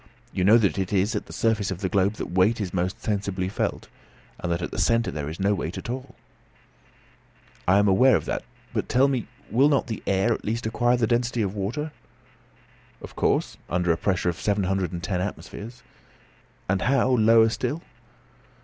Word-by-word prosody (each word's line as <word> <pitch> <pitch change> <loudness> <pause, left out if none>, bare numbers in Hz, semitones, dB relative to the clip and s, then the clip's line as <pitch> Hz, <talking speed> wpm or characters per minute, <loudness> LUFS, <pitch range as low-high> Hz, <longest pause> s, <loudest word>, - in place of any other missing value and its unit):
You 95 - 0
know 105 +5 +7
that 100 -7 +1
it 95 -1 -2
is 100 +3 +1
at 105 - -3
the - - -11
surface 110 -3 0
of 95 -2 -5
the 95 - 0
globe 100 +2 +2
that 105 - -6
weight 95 +6 +3
is 95 -4 -3
most 90 +1 -1
sensibly 100 -3 -1
felt, 95 - -2 0.5
and 90 - -3
that 85 +1 -1
at - - -4
the - - -5
centre 115 0 +2
there 75 -1 -4
is 80 - -8
no 100 +2 +2
weight 90 -3 -3
at 120 - -5
all." 130 0 -7 1.5
"I 95 +2 +5
am 105 0 +4
aware 125 +7 +5
of - - -1
that; - - -2 0.3
but, - - -2
tell 130 +2 +4
me, 130 -6 -1 0.2
will 135 +6 +4
not 140 -4 +1 0.2
air 100 +4 +2
at - - -6
last 115 +2 -2
acquire 120 +2 +2
the 120 - +2
density 120 0 0
of 95 -1 -2
water?" 120 +10 -3 1.1
"Of - - -11
course, - - 0
under 90 -1 +1
a - - +3
pressure 90 -1 0
of 85 - -4
seven 105 -1 +1
hundred 95 -2 0
and 85 -1 -6
ten 90 0 -1
atmospheres." 115 +4 -7 0.8
"And 95 -1 +1
how, 130 0 +2
lower 115 -2 +5
down 110 - +3
still?" 145 +8 -2
105 Hz, 200 wpm, -25 LUFS, 95-120 Hz, 1.5 s, know